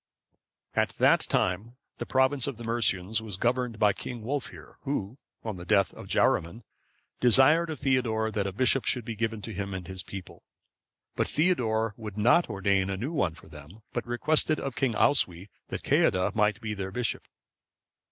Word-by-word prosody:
] - - -52
At - - -4
that - - +5
time, 105 +7 0 0.2
the - - -4
province 130 0 +2
of 135 -5 -4
the 120 - -8
Mercians 110 -3 0
was 105 -4 -6
governed 120 +1 0
by 105 -2 +4
King 120 +1 -7
Wulfhere, 135 +3 -5
who, 125 -6 -3 0.3
on 110 -4 -4
the 85 - -8
death 100 +2 +2
of - - -11
Jaruman,(543) 85 +9 +1 0.6
desired 135 +8 +5
of 155 -4 -5
Theodore 115 -5 +1
that 100 -2 -1
a - - -3
bishop 130 +5 +2
should 125 -4 +1
be 115 - -4
given 110 -1 -2
to 110 - -6
him 100 0 -4
and 90 -1 -6
his 95 -1 -6
people; 95 +2 -9 0.7
but - - 0
Theodore 115 - +1
would 105 -3 -8
not 125 +11 +4
ordain 100 -2 +1
a 95 - -2
new 130 - -4
one 95 - 0
for 90 - -15
them, 80 +7 -13
but 120 -1 -3
requested 155 +5 +1
of 135 -3 -4
King 135 -4 0
Oswy 95 -9 +2 0.2
that - - -5
Ceadda 90 0 +2
might 105 -1 +2
be 110 -1 -3
their 95 -2 -4
bishop. 120 +4 -3
110 Hz, 180 wpm, -28 LUFS, 100-125 Hz, 0.7 s, that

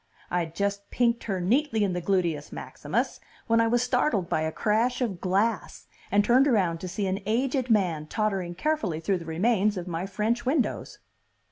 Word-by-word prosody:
I'd 170 -2 -1
just 200 +1 -2
pinked 235 -1 +1
her 195 -4 -1
neatly 225 - +1
in 195 -3 0
the 180 - -2
gluteus 170 -6 0
maximus, - - -3 0.3
when 230 0 +3
I 230 - +3
was 240 +1 +2
startled 245 - +1
by 155 - +1
a 160 0 -1
crash 225 +7 +1
of 215 -9 -2
glass, 200 +4 0 0.3
and 205 +1 +4
turned 255 +5 +5
around 185 -10 +2
to 185 - -6
see 200 +3 -3
an 190 +1 -1
aged 255 +3 0
man 175 -8 +1
tottering 195 -3 -1
carefully 210 - -1
thru 185 +3 0
the 165 - -9
remains 205 +5 +1
of 180 0 -5
my 175 +2 -3
French 215 +4 -1
windows. 260 -2 -1
200 Hz, 180 wpm, -27 LUFS, 180-235 Hz, 0.3 s, turned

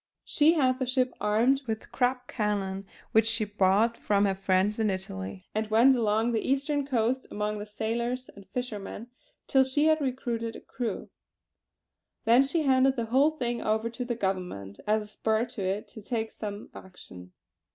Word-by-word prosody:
She 310 +2 +4
had 260 -5 +2
the 260 - -1
ship 255 0 +1
armed 235 +6 +3
with 220 -1 -4
Krupp 250 0 0
cannon 200 -3 -2 0.2
which 220 0 +4
she 225 -1 +1
bought 205 +3 +2
through 200 -1 +2
friends 190 +2 +1
in 220 -1 +2
Italy; 95 - -5
and 215 0 -2
went 235 +5 +6
along 225 -1 +1
the 225 -2 0
Eastern 280 +1 0
coast 255 0 0
amongst 210 0 -2
the 205 - -5
sailors 235 +4 -2
and 200 -1 -15
fishermen 235 -1 -5 0.3
till 265 -1 +4
she 265 +3 +1
had 315 -1 +4
recruited 240 -4 -2
a - - -7
crew. 230 -4 -5 1.1
Then 235 +3 +6
she 290 +4 +1
handed 265 -1 +4
the 235 -3 -2
whole 280 +4 +6
thing 240 -6 -3
over 220 +2 0
to 235 +2 -4
the 240 -1 -2
Government 180 - -3
as 215 0 +2
a - - -11
spur 220 +2 0
to 235 -4 -8
it 195 +2 -2
to 220 - -10
take 225 +1 -3
some 205 -1 -7
action. 90 - -12
225 Hz, 170 wpm, -28 LUFS, 205-255 Hz, 1.1 s, went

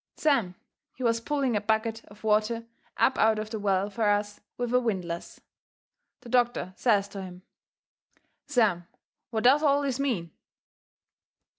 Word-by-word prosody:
Sam, 235 -12 +1 0.4
he 255 - -7
was 230 -1 +2
pulling 275 -2 0
a 205 - +1
bucket 220 +1 -1
of 205 +1 -17
water 220 +2 +1 0.3
up 260 - +2
out 220 0 +4
of 215 0 -5
the 220 - -3
well 200 0 0
fur 215 0 +1
us 205 0 0 0.2
with 245 0 -2
a 250 - +5
windlass. 185 -8 -3 0.8
The 240 - -12
doctor 240 -6 +1
says 205 -4 +2
to 200 -1 -7
him: 180 -1 -10 1.0
"Sam, 215 -11 +2 0.4
what 220 -2 -2
does 270 +4 +6
all 285 -1 +3
this 270 -2 -1
mean?" 215 - -1
220 Hz, 150 wpm, -27 LUFS, 205-245 Hz, 1.0 s, does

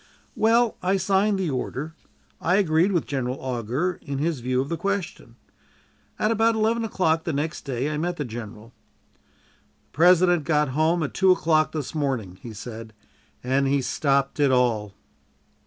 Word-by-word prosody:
Well, 230 +1 +3
I 190 +2 +1
signed 195 +2 +2
the 185 -5 -1
order; 135 +4 -4 0.5
I 180 +3 +2
agreed 180 -1 +3
with 175 -5 0
General 130 -2 -3
Augur 130 +8 -2
in 140 -3 -5
his 155 0 -1
view 125 +1 -1
of 135 - -1
the 170 - -2
question. 195 0 -4 0.8
At 215 - +1
about 225 0 +2
eleven 225 +1 +1
o'clock 165 -7 0
the 165 - -2
next 150 +2 -3
day 130 0 -2
I 150 0 -2
met 175 +2 -2
the 145 - -3
general. 115 0 -9 0.5
"The - - -37
President 175 +1 +4
got 150 -1 +1
home 160 +5 +1
at 140 - -4
two 190 -1 +4
o'clock 155 -3 +2
this 150 -4 -5
morning," 130 - -3
he 120 - -8
said, 110 +1 -9 0.5
"and 135 +2 +1
he 140 +1 +2
stopped 140 +1 0
it 145 -2 +4
all." 115 -6 +1
155 Hz, 165 wpm, -24 LUFS, 130-180 Hz, 0.8 s, President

